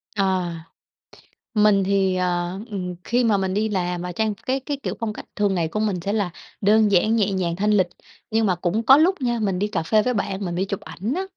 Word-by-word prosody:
Ờ. 190 -3 +1 1.0
Mình 210 -2 +4
thì, 190 -1 +1
ờ, 180 0 -1
ừm, 180 -4 -4
khi 245 +2 +1
mà 220 -3 +3
mình 190 -1 -1
đi 215 +2 0
làm 180 -3 -1
và 180 0 -4
trang 215 +4 0
cái 260 +6 -2
cái 285 +2 -4
kiểu - - -3
phong 225 -3 -2
cách - - -9
thường 205 -2 +1
ngày 170 -2 0
của 190 +7 -3
mình 210 -4 0
sẽ 200 +4 -2
là 205 -4 0 0.3
đơn 210 +1 +4
giản, 210 +4 +3
nhẹ 210 -3 +2
nhàng, 180 -3 -1
thanh 210 +4 +1
lịch. 190 -4 +3 0.4
Nhưng 225 0 +2
mà 185 -3 +2
cũng 180 +6 -1
có 265 +4 +8
lúc 340 +2 +3
nha, 240 -2 0
mình 195 -4 0
đi 205 - +1
cà 210 -5 -2
phê 215 +6 +3
với 250 - 0
bạn, 200 -2 -2
mình 175 -1 -3
đi 185 +2 0
chụp 200 0 -4
ảnh 220 +8 -4
á, 370 - -1
200 Hz, 245 wpm, -23 LUFS, 185-220 Hz, 1.0 s, có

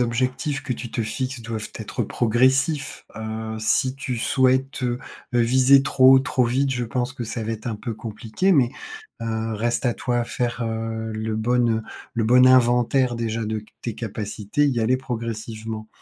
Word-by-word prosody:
objectifs 130 +4 -1
que 130 - -1
tu 120 -1 -6
te - - -3
fixes 120 +3 -3
doivent 110 -2 -5
être - - -3
progressifs. 130 +6 +1
Heu, 110 0 -5
si 130 +4 +2
tu 130 -2 -4
souhaites, 130 +3 +1
heu 120 0 0 0.3
heu, 120 - +3
viser 130 +3 +5
trop 130 0 +6
haut, - - +8
trop 130 0 +1
vite, 130 +3 +1
je 125 - -2
pense 125 +2 -2
que 125 - -6
ça 115 0 -4
va 115 - -2
être 110 +2 -5
un 110 - -3
peu 115 +2 -5
compliqué. 110 - -2
Mais, 130 -9 +4 0.5
heu, 115 0 -2
reste 120 +4 -1
à 120 - +1
toi 120 -1 -1
faire, 120 -1 -2
heu, 110 0 -3
le 110 0 -3
bon, 120 +2 +2
heu, 110 0 0 0.3
le 115 -2 0
bon 125 +2 +6
inventaire 125 0 +4
déjà 115 -1 -2
de 110 0 -2
c - - -16 0.2
tes 115 - -4
capacités, 110 +4 -2
y 125 -4 +1
aller 125 +4 +2
progressivement. 115 -3 -5
120 Hz, 185 wpm, -23 LUFS, 110-130 Hz, 0.5 s, haut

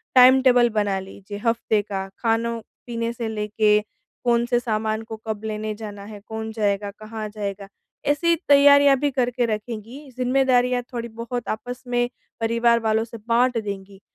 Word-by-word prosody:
Time 260 +1 +8
table 245 -2 +5
बना 205 -3 0
लीजिए 195 +1 -9
हफ़्ते 230 -2 +2
का। 195 -2 -4
खानो, 230 0 0 0.3
पीने 230 0 -2
से 235 -1 -4
लेके 210 0 +2 0.4
कौन 235 -1 +3
से 240 0 +2
सामान 220 -2 -1
को 220 0 -7
कब 215 -1 -3
लेने 215 0 -3
जाना 205 -2 -8
है? 210 0 -9
कौन 220 0 -5
जाएगा? 205 -2 -1
कहाँ 215 +1 -7
जाएगा? 200 -1 -5 0.4
ऐसी 335 +4 +3
तैयारियाँ 285 0 +7
भी 290 -1 +1
करके 245 -1 0
रखेंगी, 230 +5 -5
ज़िम्मेदारियाँ 250 -1 +2
थोड़ी 235 -1 -3
बहुत 230 +1 -5
आपस 245 +3 -5
में 245 0 +1 0.3
परिवार 235 +1 +3
वालों 220 -1 +1
से 230 0 -9
बाँट 245 +1 +3
देंगी 195 -1 -7
230 Hz, 155 wpm, -23 LUFS, 215-245 Hz, 0.4 s, Time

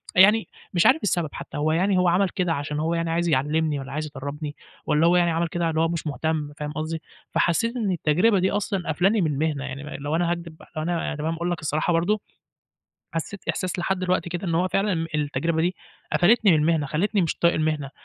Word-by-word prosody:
يعني 210 +4 +6 0.3
مش 175 - +3
عارف 315 - +5
السبب 175 -5 0
حتى، - - -7
هو 150 +2 +1
يعني 185 +4 +2
هو 180 0 +3
عمل 180 +2 +3
كده 180 -3 0
عشان 150 0 -3
هو 165 +2 0
يعني 165 0 -1
عايز 170 +1 0
يعلّمني 150 +2 +1
والّا 135 0 -7
عايز 155 +2 -3
يدرّبني، 145 +1 -6 0.3
والّا 155 +3 +3
هو 175 - +4
يعني 175 -1 +3
عمل 170 +1 0
كده 170 0 -1
اللي 160 0 0
هو 165 - +3
مش 165 -1 -3
مُهتم، 150 0 -2
فاهم 150 0 -4
قصدي، 155 +1 -4 0.3
فحسّيت 230 +8 +1
إن 220 -6 0
التجربة 180 +5 +3
دي 185 +1 +1
أصلًا 200 -2 -1
قافلاني 195 +7 +2
من 155 -4 +1
المهنة، 145 0 -1
يعني 140 0 -6
ما 150 - -8
لو 145 +2 -3
أنا 170 +1 +1
هاكدِب 170 -2 -5
بقى - - -17
لو 155 - -2
أنا 170 -1 -1
تمام 155 +2 -2
اقول 170 +2 -2
لَك 175 - -2
الصراحة 155 +3 0
برضه، 195 +6 +1 0.9
حسّيت 165 +4 -5
إحساس 185 0 -1
لحد 185 +2 0
دلوقتي 180 -1 0
كده 175 +2 -4
إن 165 - 0
هو 180 +2 +2
فعلًا 195 +1 +1
ام 165 -1 -1
التجربة 150 +2 0
دي 180 +1 +1 0.4
قفلتني 215 +3 +5
من 160 - +5
المهنة، 155 -1 +2
خلّيتني 200 +7 +1
مش 165 - -1
طايق 170 0 +3
المهنة، 155 -3 -1
165 Hz, 225 wpm, -24 LUFS, 155-180 Hz, 0.9 s, يعني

